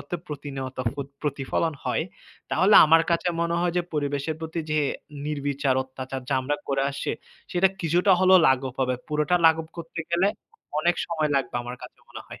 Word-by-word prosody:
অর্থে 175 - -5
প্রতিনিয়ত 135 -3 -6 0.5
প্রতিফলন 145 +2 -1
হয়, 125 +5 0 0.5
তাহলে 200 +3 +4
আমার 165 +1 +6
কাছে 170 +1 +1
মনে 170 0 0
হয় 175 -1 +1
যে, - - +1
পরিবেশের 145 +1 -1
প্রতি 160 +1 -4
যে 155 0 +2 0.5
নির্বিচার 140 -2 -1
অত্যাচার, 130 0 -7
যা 140 - +1
আমরা 145 +3 -1
করে 135 0 +1
আসছি, 140 - -3 0.4
সেটা 185 +2 +4
কিছুটা 175 +4 +3
হলেও 185 0 +7
লাঘব 130 -1 +1
হবে, 130 -1 +1
পুরোটা 150 +4 +1
লাঘব 160 0 +3
করতে 165 0 -6
গেলে 175 +3 +3 0.5
অনেক 175 +2 +2
সময় 155 -3 -1
লাগবে 135 -2 -2
আমার 125 +1 -7
কাছে - - -11
মনে - - -8
হয়। - - -10
150 Hz, 170 wpm, -25 LUFS, 135-170 Hz, 0.5 s, হলেও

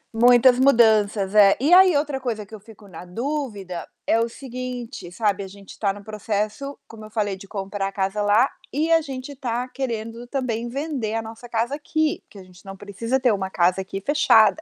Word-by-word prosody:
Muitas 245 +2 +6
mudanças, 215 -6 +4
é. 200 -2 +6
E 295 +7 +3
aí 365 -3 +7
outra 285 -2 -1
coisa 220 -5 -3
que 220 - -19
eu 215 - -8
fico 215 0 -16
na 175 -2 -10
dúvida, 205 - -4 0.2
é 225 - +3
o 230 +1 0
seguinte, 250 -6 -7
sabe, 205 0 0
a - - -7
gente 195 +1 -14
tá 200 -2 +1
no 205 0 -10
processo, 215 +5 -3
como 220 -1 -12
eu - - -12
falei, 210 -3 -1
de 195 +1 -13
comprar 195 0 -4
a 195 - -5
casa 195 +1 -2
lá 210 +6 +4 0.2
e 315 +4 0
a 330 - +5
gente 275 -1 -7
tá 250 -1 -3
querendo 235 -2 -5
também 240 -3 -2
vender 270 -5 -3
a 225 - 0
nossa 225 +2 -10
casa 235 +3 -1
aqui, 310 +1 -1
que - - -15
a 195 - -10
gente 185 +1 -18
não 195 0 -9
precisa 230 +6 -2
ter 250 -4 +3
uma 190 -1 -2
casa 185 +1 +2
aqui, 195 +1 -6
fechada. 285 0 +4
225 Hz, 205 wpm, -23 LUFS, 200-255 Hz, 0.2 s, aí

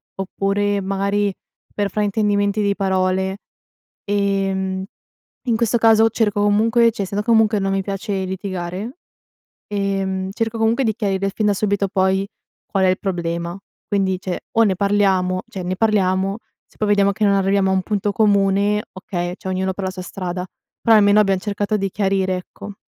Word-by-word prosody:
oppure 200 +1 -1
magari 200 +1 0 0.4
per 205 -1 -1
fraintendimenti 205 0 +1
di 200 -1 +1
parole. 190 0 0 0.7
Ehm. 195 -2 0 0.6
In 235 - +2
questo 235 0 +2
caso 225 0 +5
cerco 210 -2 0
comunque, 225 +3 +3
cioè, 210 - -4
essendo 200 +2 -3
comunque 220 -2 +3
non 195 0 -1
mi 195 0 +1
piace 195 0 -3
litigare, 190 - -5 0.7
ehm, 195 -2 -2
cerco 225 +1 -2
comunque 225 +4 +2
di 220 -3 +1
chiarire 195 -3 -1
fin 210 +1 0
da 205 - +3
subito 200 0 0
poi 190 0 +1 0.4
qual 195 -2 0
è - - +4
il 185 - +1
problema. 170 -2 -3 0.3
Quindi, 190 -3 0
cioè, 185 -1 -4
o 230 - +5
ne 200 -4 +2
parliamo 190 -2 +1
cioè, 190 - -6
ne 180 +1 -2
parliamo; 195 -2 +1 0.3
se - - -28
poi 215 - -1
vediamo 200 -1 +4
che 215 - -3
non 200 - +4
arriviamo 195 0 +2
a - - +2
un 190 - +2
punto 205 0 -1
comune, 200 0 +2
okay, 175 -2 -4
cioè, - - -9
ognuno 190 0 -1
per 195 0 -5
la 185 - -2
sua 185 0 -7
strada. 180 -1 -5 0.4
Però 225 - +5
almeno 205 0 +5
abbiamo 195 -2 +1
cercato 205 +1 -1
di 195 -1 -1
chiarire, 190 -2 0
ecco. 205 +3 -9
195 Hz, 170 wpm, -20 LUFS, 190-205 Hz, 0.7 s, caso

